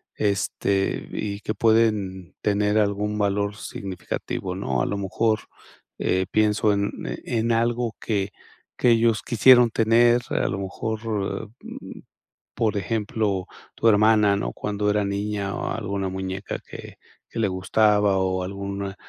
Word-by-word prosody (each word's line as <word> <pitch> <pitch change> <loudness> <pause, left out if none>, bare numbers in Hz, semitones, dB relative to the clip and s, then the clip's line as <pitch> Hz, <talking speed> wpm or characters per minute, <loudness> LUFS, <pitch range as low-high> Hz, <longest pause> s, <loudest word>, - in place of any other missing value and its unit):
este, 100 -1 0
y 100 -1 -3
que 110 - -2
pueden 105 -6 +1
tener 105 +1 +2
algún 105 0 0
valor 100 0 0
significativo, 95 -1 -5
¿no? 65 -10 -1
A - - 0
lo 100 - -2
mejor, 110 +3 0 0.6
eh, 95 +1 +1
pienso 105 0 +3
en 100 0 0 0.3
en 115 0 0
algo 115 0 0
que 100 -3 -1 0.5
que 125 - +5
ellos 115 -1 +3
quisieron 120 0 +6
tener, 120 +2 +4
a - - 0
lo 95 - -2
mejor, 110 +3 -3 0.6
mm, - - -9 0.6
por 110 -3 0
ejemplo, 105 -2 -1 0.3
tu - - -2
hermana, 105 -1 +5
¿no?, 100 - -2
cuando 105 0 -2
era 105 0 +2
niña 100 0 -2
o - - -3
alguna 100 -3 -2
muñeca 95 +1 -4
que - - -10 0.3
que - - -8
le 110 -3 +2
gustaba, 105 +2 +2
o 95 0 0
algún, 100 +1 -4
105 Hz, 135 wpm, -24 LUFS, 100-110 Hz, 0.6 s, quisieron